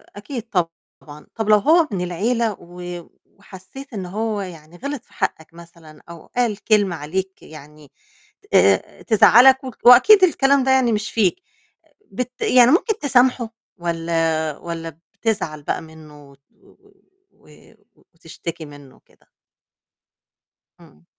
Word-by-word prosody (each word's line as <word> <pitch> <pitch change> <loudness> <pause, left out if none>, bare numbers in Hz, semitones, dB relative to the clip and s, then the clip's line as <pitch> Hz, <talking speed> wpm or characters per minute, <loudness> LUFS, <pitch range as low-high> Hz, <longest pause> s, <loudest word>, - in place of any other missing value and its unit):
أكيد 225 +3 -7
طبعًا، 165 -4 -6
طَب 220 -2 -3
لو 210 - +7
هو 315 - +3
من 185 -3 -3
العيلة، 220 +6 -1
و 175 0 -9 0.2
وحسّيت 200 +8 -14
إن 190 -3 -5
هو 210 +2 -3
يعني 170 -2 -11
غِلط 280 0 -6
في - - -27
حقّك 160 +1 -4
مثلًا، 170 -2 -16
أو 170 -2 -12
قال 235 -4 -2
كلمة 205 -5 +2
عليك 190 +6 -5
يعني 150 -1 -15 0.6
آآ 95 -1 +2
تزعّلك 255 +5 +5
و 260 - -6
وأكيد 375 - +7
الكلام 280 -5 +3
ده 265 - +1
يعني 260 -3 +3
مش 215 0 -2
فيك، 225 - 0 0.7
بت 250 0 -6
يعني 250 0 +5
ممكن 405 +5 +1
تسامحه، 250 -4 +1 0.2
والّا 165 -2 -2
والّا 165 -1 -8
بتزعل 175 -10 -3
بقى - - -3
منه 155 -3 -15
وت 140 0 -23
و 210 - -26 0.6
و - - -27 0.7
وتشتكي 165 0 -9
منه 145 -2 -15
وكده؟ - - -30 1.5
امم. 75 +3 -21
190 Hz, 130 wpm, -20 LUFS, 165-240 Hz, 1.5 s, لو